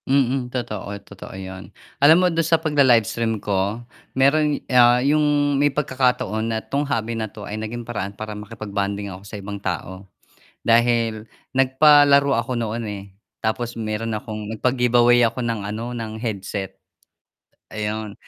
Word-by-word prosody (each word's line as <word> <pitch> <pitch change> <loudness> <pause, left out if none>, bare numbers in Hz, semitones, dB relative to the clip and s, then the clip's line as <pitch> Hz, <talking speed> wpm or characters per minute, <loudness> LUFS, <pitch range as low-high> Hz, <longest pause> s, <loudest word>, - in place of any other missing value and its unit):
Mm, 130 -2 +1
totoo, 105 -5 -5
totoo 95 -1 -10
yun 95 -1 -8 0.3
alam 155 +3 +8
mo 180 - +3
dun 165 - +2
sa 165 +1 +3
pagla-livestream 120 - +2
ko 100 +3 -2 0.3
merong, 150 +2 +2
ah, 120 -1 +6
yung 145 +4 +2 0.4
may 145 - +4
pagkakataon 125 -6 0
na 110 - -1
'tong 140 +1 -2
hobby 115 -2 -1
na 110 -1 -3
'to 105 0 -10
ay - - -7
naging 120 +2 -5
paraan 100 -4 -5
para 110 0 -6
makipag-bonding 100 -1 -4
ako 95 - -10
sa 105 - -7
ibang 100 0 -7
tao 95 +1 -5 0.6
dahil 115 -1 +2 0.2
nag-palaro 140 +1 +5
ako 120 0 -1
noon, 115 0 -3
eh, 100 -1 -6 0.4
tapos 120 +2 -2
meron 110 0 -3
akong 105 -1 -6
nag-pagiveaway 120 0 +3
ako 125 +2 -5
ng 115 -2 -2
ano 115 +4 -5
ng 115 -2 -5
headset, 100 -3 -5 0.9
ayun, 105 -1 -3
115 Hz, 145 wpm, -22 LUFS, 105-125 Hz, 0.9 s, alam